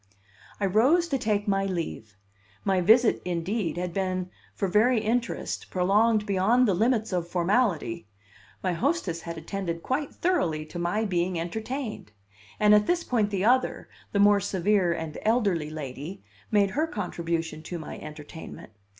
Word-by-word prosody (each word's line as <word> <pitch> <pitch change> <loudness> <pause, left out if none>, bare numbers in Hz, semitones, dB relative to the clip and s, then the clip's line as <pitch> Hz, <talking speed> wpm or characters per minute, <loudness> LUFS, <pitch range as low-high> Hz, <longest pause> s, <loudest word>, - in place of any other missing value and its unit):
I 200 - +1
rose 260 - +4
to 275 -3 0
take 210 -2 0
my 195 -1 +1
leave; 160 - -5 0.5
my 190 -2 +2
visit, 225 +6 +5
indeed, 180 +2 -2
had 180 -1 -3
been, 185 -1 -2 0.2
for 195 - -1
very 220 +6 +3
interest, 230 +2 -2
prolonged 210 +4 +2
beyond 210 +6 +3
the 200 - +3
limits 220 +2 +1
of 175 -2 -1
formality 175 - 0 0.6
my 185 -2 +1
hostess 200 - -1
had 170 0 -6
attended 170 0 -4
quite 275 +2 -1
thoroughly 175 - 0
to 175 +3 -7
my 175 +6 0
being 180 -2 0
entertained. 220 - -5 0.5
And 210 0 +6
at 210 0 +5
this 350 -1 +1
point 220 -5 +1
the 195 -1 -1
other, 255 +2 +2 0.2
the - - -1
more 205 0 +6
severe 195 -1 +1
and 160 -2 -4
elderly 200 -9 +1
lady, 155 +4 -7 0.3
made 200 -2 +3
her 310 +7 0
contribution 170 - -3
to 175 +2 -6
my 160 - -7
entertainment. 150 -4 -10
195 Hz, 150 wpm, -27 LUFS, 170-220 Hz, 0.6 s, And